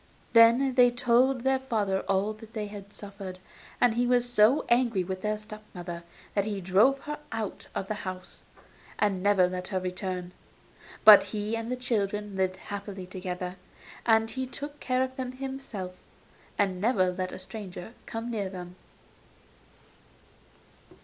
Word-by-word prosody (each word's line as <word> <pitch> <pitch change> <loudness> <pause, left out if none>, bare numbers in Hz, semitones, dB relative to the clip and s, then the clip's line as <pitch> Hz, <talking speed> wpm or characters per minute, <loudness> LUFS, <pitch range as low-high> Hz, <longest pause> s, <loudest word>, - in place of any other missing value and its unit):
Then 235 +4 +6
they 250 -1 +6
told 245 +1 +3
their 265 0 +3
father 210 -7 0
all 195 +2 +2
that 220 +1 -14
they 215 -3 -3
had 205 -1 -9
suffered, 200 -3 -8 0.4
and 245 -2 +4
he 245 +2 +1
was 245 0 +3
so 240 +3 +4
angry 235 -5 +3
with 185 +1 -5
their 210 0 0
step 215 0 -9
mother 175 -1 -6 0.3
that 200 -1 +1
he 205 -2 -2
drove 205 +10 +4
her 300 0 -5
out 225 -3 -4
of 190 - -2
the 215 - -1
house, 185 -1 -6 0.6
and 200 -3 +1
never 195 -2 +4
let 180 0 -4
her 190 -2 -1
return; 180 -1 -4 0.7
but 215 -1 +11
he 210 +1 -2
and 230 +1 -4
the - - +1
children 210 -4 -1
lived 190 -1 0
happily 200 -1 -6
together; 180 -1 -5 0.5
and 225 -1 +3
he 260 -1 -3
took 290 +3 -6
care 255 0 +1
of 260 0 -4
them 255 -1 -3
himself, 265 -8 -6 0.6
and 190 -3 +1
never 195 -5 +3
let 185 0 -3
a - - -6
stranger 190 +1 -8
come 230 +1 -4
near 205 -4 -2
them. 180 -1 -8
210 Hz, 155 wpm, -28 LUFS, 190-240 Hz, 0.7 s, but